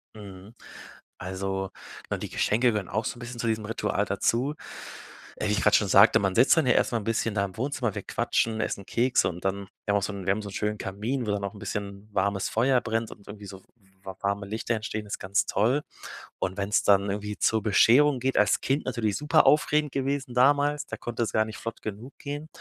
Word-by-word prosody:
Mhm. 100 0 -11 0.6
Also, 95 +1 -4 0.4
na, - - -1
die - - -6
Geschenke 120 +4 +2
gehören 105 -4 -3
auch 110 +1 -1
so - - -3
'n - - -12
bisschen 120 0 -8
zu 115 - -1
diesem 110 -1 -1
Ritual 105 -2 -1
dazu. 115 +8 0 0.8
Äh, - - -2
wie - - +2
ich 105 - 0
grade - - +4
schon - - +3
sagte, - - +7
man 95 -2 0
sitzt 130 +7 +5
dann 160 -5 +3
ja 125 - +5
erst - - +2
mal 115 - +1
'n - - -8
bisschen 115 -1 0
da 100 -1 +1
im 95 -1 -10
Wohnzimmer, 125 -3 -2
wir - - -4
quatschen, 110 -1 0
essen 100 - -3
Kekse 125 -1 +2
und 90 0 -8
dann 100 0 -2 0.2
wir 100 - +1
haben - - +4
auch - - -6
so 105 - -2
'n 100 -2 -7
wir 95 - +2
haben 105 +2 -1
so 100 - -6
'n - - -10
schönen 105 +1 -2
Kamin, 110 +7 -3
wo - - +1
dann 100 0 -1
noch 100 0 -4
'n - - -11
bisschen 100 0 -5
warmes 100 0 0
Feuer 125 +2 +2
brennt 115 0 -2
und 100 - -14
irgendwie 105 0 -9
so 95 0 -11 0.4
wa 95 -1 -7
warme 100 0 -1
Lichter 110 +3 -2
entstehen, 110 -1 -4
ist 100 - -4
ganz 100 +1 0
toll. 120 +9 +1 0.6
Und 95 +1 -2
wenn's 100 +1 +1
dann 100 0 +4
irgendwie 105 +1 -4
zur 110 -2 +1
Bescherung 125 +6 +5
geht 130 +2 -1
als 105 - +4
Kind 135 +3 0
natürlich 115 -5 -1
superaufregend 150 0 +3
gewesen 135 -1 -2
damals, 145 +3 +3
da - - -6
konnte 120 0 -3
es 115 - -2
gar 110 - +3
nicht 110 - -8
flott 115 0 -6
genug 110 +5 -7
gehen, 145 +1 -6
110 Hz, 230 wpm, -27 LUFS, 100-125 Hz, 0.8 s, sagte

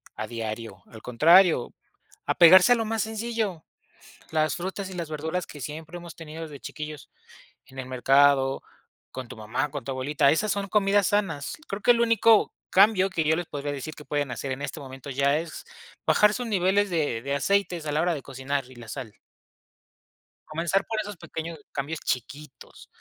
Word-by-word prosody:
a - - -4
diario. 110 -4 -6
Al 110 - -13
contrario, 160 - +4 0.5
apegarse 180 +6 +7
a - - +3
lo 225 -1 -1
más 225 -1 -1
sencillo, 220 -5 -3 0.7
las 155 -1 +1
frutas 190 +2 -4
y - - -8
las 170 -3 -5
verduras 160 +4 -3
que 145 - -11
siempre 155 +5 -7
hemos 170 -1 -11
tenido 160 0 -8
desde 145 -3 -10
chiquillos, 150 -1 -8 0.6
en 130 - -12
el 130 - -5
mercado, 135 +1 +3 0.5
con 130 -1 -7
tu - - -8
mamá, 125 +7 -2
con 145 -2 -5
tu - - -6
abuelita, 140 +2 +2
esas 210 +6 +1
son 200 -1 -2
comidas 200 -1 +3
sanas. 170 -9 -1
Creo 200 +1 -5
que - - -1
el 235 -1 +3
único 230 -1 +4 0.2
cambio 195 -1 +5
que 170 -4 -1
yo 155 +1 +3
les 175 - -3
podría 145 0 -4
decir 145 +2 -6
que 150 - -11
pueden 145 -2 -1
hacer, 135 +2 -4
en 130 +2 -4
este 145 +2 -5
momento, 135 0 -9
ya 140 +3 +2
es 165 -1 -7 0.4
bajar 210 0 +4
sus 245 +3 -3
niveles 200 0 +2
de 150 -9 -1
de 140 +1 -2
aceites, 180 +1 0
a 150 - -2
la 150 - +2
hora 175 +1 +1
de 145 - -6
cocinar 135 0 -3
y - - -14
la 120 -2 -11
sal. 110 -1 -7 1.3
Comenzar 170 +5 0
por 220 -1 -2
esos 205 -1 -6
pequeños 160 0 -7
cambios 150 +3 -4
chiquitos. 135 +3 -6
155 Hz, 185 wpm, -26 LUFS, 140-190 Hz, 1.3 s, apegarse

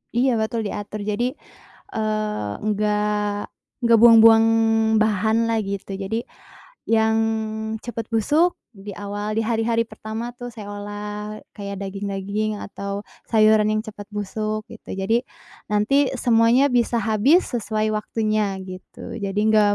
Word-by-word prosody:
Iya 255 +2 +3
betul 220 0 -2
diatur 205 0 -5
jadi, 240 +6 -1 0.6
eee, 215 - -2
nggak 210 0 0 0.5
nggak 230 -1 +6
buang-buang 225 -1 +8 0.5
bahan 220 +1 +2
lah 225 -1 +1
gitu 195 0 -5
jadi, 200 +4 -3 0.6
yang 220 0 +3 0.7
cepet 230 -2 -5
busuk 295 +11 +2 0.2
di 205 -1 -9
awal 205 +1 -4
di 225 - +2
hari-hari 230 0 +1
pertama 225 +1 -6
tuh 245 - -6
saya 210 -3 -8
olah 210 +1 -6 0.2
kayak 200 -1 -6
daging-daging 200 +2 -3
atau 200 0 -5 0.3
sayuran 215 -1 +5
yang 215 0 0
cepet 205 -1 -9
busuk 215 +1 -3
gitu, 230 - -8
jadi 225 +6 0 0.4
nanti 230 +7 +2
semuanya 240 +2 +4
bisa 240 -1 +2
habis 225 - +3
sesuai 215 -2 -1
waktunya 215 -2 -1
gitu. 185 +4 -9
Jadi 200 -1 -2
nggak 210 -1 +4
215 Hz, 125 wpm, -22 LUFS, 205-230 Hz, 0.7 s, buang-buang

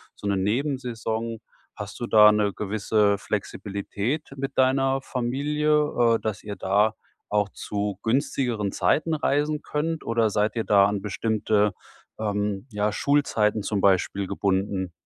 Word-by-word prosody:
so 105 - -6
'ne 100 -1 +1
Nebensaison. 115 0 -2 0.4
Hast 105 +2 -8
du 120 - -2
da 105 -1 +7
'ne 105 -1 +1
gewisse 105 0 +1
Flexibilität 100 +12 -4
mit 135 +1 -5
deiner 135 +1 +2
Familie, 140 0 +1
äh, - - -1
dass 110 -3 -4
ihr 105 -1 -6
da 105 +3 +2 0.4
auch 105 -1 +1
zu 100 -1 -4
günstigeren 120 -3 0
Zeiten 160 +1 +1
reisen 150 +1 0
könnt? 160 +2 -2
Oder 115 -1 +2
seid 105 +2 0
ihr 115 - -1
da 100 -1 +5
an 100 -1 -2
bestimmte, 105 -1 0 0.5
ähm, 105 +1 -2
ja, 105 0 0
Schulzeiten 110 -5 +1
zum 100 -1 -1
Beispiel 95 0 +2
gebunden? 95 -2 -1
110 Hz, 135 wpm, -25 LUFS, 100-130 Hz, 0.5 s, da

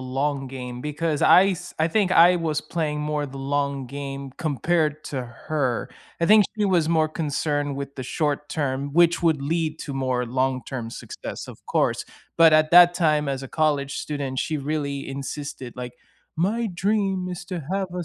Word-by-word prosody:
long 135 +2 -2
game 125 -2 -7
because 150 +2 -2
I 190 +2 +7
s 180 -1 -4
I 160 - +3
think 190 0 +1
I 175 +2 +7
was 160 -3 -1
playing 155 -2 -2
more 150 -1 -1
the 135 - -10
long 140 -1 -1
game 140 0 -6
compared 155 +1 0
to 130 -3 -4 0.3
her. 135 -6 -1 0.3
I 170 - +2
think 215 0 +7
she 210 - +1
was 175 -5 +2
more 160 -1 +3
concerned 145 -2 -1
with 140 0 -6
the 130 - -5
short-term, 145 -2 -2
which 170 +1 +4
would 160 -4 +2
lead 160 +1 -1
to 140 - -5
more 130 -2 -1
long-term 130 -1 -2
success, - - -7
of - - -12
course. - - +1 0.3
But 165 -1 +7
at 155 0 +4
that 175 0 +8
time 155 -4 +2
as 135 -1 -2
a 135 - -7
college 145 -3 0
student, 140 -3 -4
she 155 - -1
really 140 -1 -3
insisted, 135 -2 -6
like, 125 -1 -6 0.4
"My 215 +7 0
dream 195 0 0
is 180 0 -6
to 180 -2 -4
have 195 -1 -1
a 180 -1 -4
150 Hz, 175 wpm, -24 LUFS, 135-170 Hz, 0.4 s, that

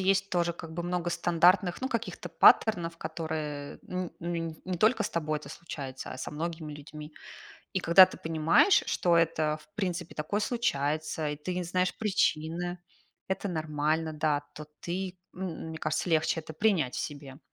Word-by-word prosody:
есть 195 +1 +2
тоже 170 -1 +1
как 165 -1 -9
бы 170 +1 -3
много 175 0 -1
стандартных, 175 +3 +3
ну, 260 - 0
каких-то 210 -7 -4
паттернов, 170 -1 +5
которые 155 -3 -4
н 180 -1 -3
н 165 -1 -3
не 180 -2 -3
только 220 +5 +4
с - - -2
тобой 155 -2 -1
это 140 -2 -11
случается, 140 -6 -7
а - - -7
со - - -5
многими 160 0 -4
людьми. 150 +1 -10 0.6
И 190 - +1
когда 180 +2 +8
ты - - -10
понимаешь, 165 - +4
что 175 -1 +2
это 155 -2 +2
в - - -22
принципе 180 -4 -3
такое 155 +7 -1
случается, 155 - -1
и 150 - -2
ты 165 +5 -4
не 180 - -2
знаешь 180 +1 0
причины, 175 -4 0 0.5
это 190 +1 -2
нормально, 155 -1 -1
да. 150 -1 +1
То 150 - -7
ты 185 +1 -3 0.2
м 180 -3 -5
мне 160 - -5
кажется, 155 +3 -1
легче 160 0 +2
это 160 0 -9
принять 160 - +1
в - - -2
себе. 140 -2 -6
165 Hz, 170 wpm, -29 LUFS, 155-180 Hz, 0.6 s, когда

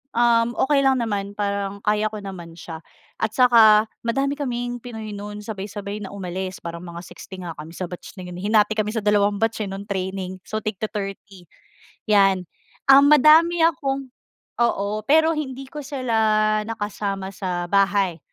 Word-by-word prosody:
um, 230 -1 +4
okay 285 +1 +3
lang 265 -2 +3
naman, 200 -2 -3
parang 200 -1 -2
kaya 210 0 +1
ko 210 -1 -7
naman 175 -4 -8
siya 165 -1 -8 0.4
at 220 -1 0
saka 225 -4 +6 0.2
madami 275 +4 0
kaming 245 -2 -3
pinoy 220 -3 -8
no'n 210 +1 -7
sabay-sabay 205 0 -6
na 195 - -9
umalis. 185 -1 -5
Parang 170 +1 -6
mga 170 0 -7
60 185 +1 -10
nga 170 -2 -7
kami 160 +2 -9
sa 185 0 -5
batch 180 - -9
na 185 -2 -8
'yon, 175 - -8
eh, - - -8
hinati 215 0 +3
kami 210 0 -1
sa 220 - 0
dalawang 205 0 +2
batch, 225 -1 0
eh, 195 - -6
no'ng 195 +1 -6
training, 190 -1 -3
so 215 0 -4
tig 215 -3 -4
ti-thirty, 195 -4 -6 0.6
'yan. 195 -3 +4 0.4
Um, 280 +1 +8
madami 320 +4 +6
akong 275 -5 -1 0.5
oo, 210 -2 0
pero 320 +2 +4
hindi 270 -2 -5
ko 300 - -7
sila 220 -6 +1
nakasama 205 -3 -4
sa 180 -2 -3
bahay, 195 -3 +2
210 Hz, 165 wpm, -22 LUFS, 195-235 Hz, 0.6 s, Um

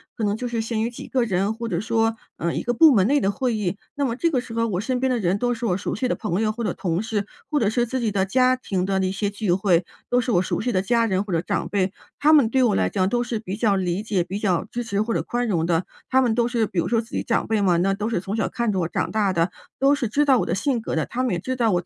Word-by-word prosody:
可 225 - -4
能 205 0 +1
就 250 - -3
是 235 -2 -2
限 220 -1 -2
于 235 - 0
几 240 - -9
个 255 -2 +1
人， 200 0 0
或 230 +1 -5
者 170 -5 -1
说， 225 0 +1 0.2
呃， 170 0 -1
一 - - -1
个 240 - -1
部 310 +2 +7
门 195 -3 +4
内 285 +3 +3
的 195 - +2
会 240 +2 -1
议， 200 -2 -2 0.2
那 285 -1 0
么 235 -2 -1
这 335 +5 +1
个 265 -6 +1
时 235 -2 -10
候 230 0 +1
我 185 -4 -1
身 255 +2 -1
边 260 0 +1
的 250 - +1
人， 190 -1 +1
都 245 +2 0
是 235 0 -4
我 180 - +1
熟 200 - -3
悉 250 +4 -1
的 - - 0
朋 200 -2 -2
友 215 -1 +1
或 235 +2 -5
者 210 - -1
同 180 -1 -1
事， 215 -2 -2 0.2
或 300 -2 +1
者 210 - +2
是 240 +2 +1
自 260 +2 -3
己 220 -3 0
的 190 -1 +1
家 255 +5 +3
庭 190 -7 -2
的 195 0 0
那 185 0 0
些 200 +1 -1
聚 205 -2 -2
会， 185 -3 +2 0.2
都 245 - +3
是 245 0 -2
我 175 - +4
熟 - - -2
悉 245 +2 -1
的 185 - +2
家 230 +3 +2
人 190 -2 0
或 200 - -8
者 165 - +2
长 - - -2
辈。 190 -2 0 0.3
他 300 +2 +5
们 270 -7 +5
对 260 +2 +2
我 220 -5 +3
来 - - +1
讲 185 -2 +1
都 240 +4 0
是 235 -2 -3
比 195 -2 -5
较 210 -2 +2
理 185 +2 -1
解， 200 -5 0
比 195 +3 -4
较 185 -5 0
支 240 0 -5
持 205 -2 -1
或 230 +1 -1
者 - - 0
宽 240 0 -2
容 170 -6 +1
的， 170 +1 +1 0.2
他 260 0 +4
们 235 -3 +1
都 235 0 +2
是 230 -3 +1
比 175 - -2
如 - - 0
说 230 -1 +2
自 230 +1 -7
己 - - -1
长 230 - 0
辈 220 -2 +1
嘛， 180 -3 +3
那 195 +3 +2
都 210 +3 -2
是 225 - 0
从 195 +3 -4
小 225 - 0
看 235 -4 -1
着 185 - 0
我 165 - -1
长 - - -1
大 205 -3 +1
的， 170 0 +1 0.3
都 275 +2 +4
是 240 -6 -2
知 295 +5 +2
道 270 -3 +5
我 - - 0
的 - - -1
性 235 +5 0
格 - - -3
的， - - +1
他 255 +2 -3
们 250 - 0
也 170 - -1
知 260 +7 -3
道 230 -4 +2
我 175 - +2
220 Hz, 350 characters per minute, -23 LUFS, 190-240 Hz, 0.3 s, 部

